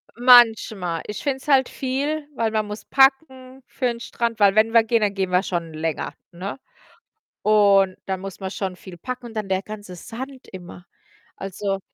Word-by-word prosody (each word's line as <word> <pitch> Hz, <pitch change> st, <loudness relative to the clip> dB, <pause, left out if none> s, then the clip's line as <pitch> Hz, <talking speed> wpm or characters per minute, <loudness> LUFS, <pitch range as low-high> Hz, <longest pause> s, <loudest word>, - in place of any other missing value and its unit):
manchmal. 225 Hz, -8 st, +5 dB
Ich 210 Hz, -, -6 dB
finde 275 Hz, -2 st, 0 dB
es 265 Hz, -, -16 dB
halt 270 Hz, -3 st, +4 dB
viel, 285 Hz, +3 st, -3 dB
weil 225 Hz, -1 st, 0 dB
man 215 Hz, -1 st, 0 dB
muss 210 Hz, +1 st, -7 dB
packen 265 Hz, -1 st, +2 dB
für 235 Hz, +2 st, -4 dB
'n 235 Hz, -1 st, 0 dB
Strand, 230 Hz, -1 st, -3 dB
weil 200 Hz, 0 st, +5 dB
wenn 225 Hz, +1 st, +3 dB
wir 230 Hz, -, +6 dB
gehen, 225 Hz, 0 st, +1 dB
dann 205 Hz, -1 st, +1 dB
gehen 190 Hz, -2 st, -1 dB
wir 180 Hz, +2 st, +3 dB
schon 170 Hz, -3 st, -3 dB
länger, 160 Hz, 0 st, -3 dB, 0.2 s
ne, 190 Hz, +9 st, -6 dB, 0.8 s
und 200 Hz, -3 st, +4 dB
da 190 Hz, -1 st, -1 dB
muss 195 Hz, 0 st, -8 dB
man 190 Hz, -1 st, -5 dB
schon 190 Hz, -2 st, -4 dB
viel 180 Hz, -1 st, -12 dB
packen 250 Hz, +5 st, -6 dB
und 225 Hz, -, -10 dB
dann 210 Hz, -3 st, -4 dB
der 190 Hz, 0 st, 0 dB
ganze 205 Hz, -4 st, -9 dB
Sand 260 Hz, +7 st, -9 dB
immer, 180 Hz, -1 st, -10 dB, 0.5 s
also 195 Hz, 0 st, -3 dB
215 Hz, 185 wpm, -22 LUFS, 190-250 Hz, 0.8 s, wir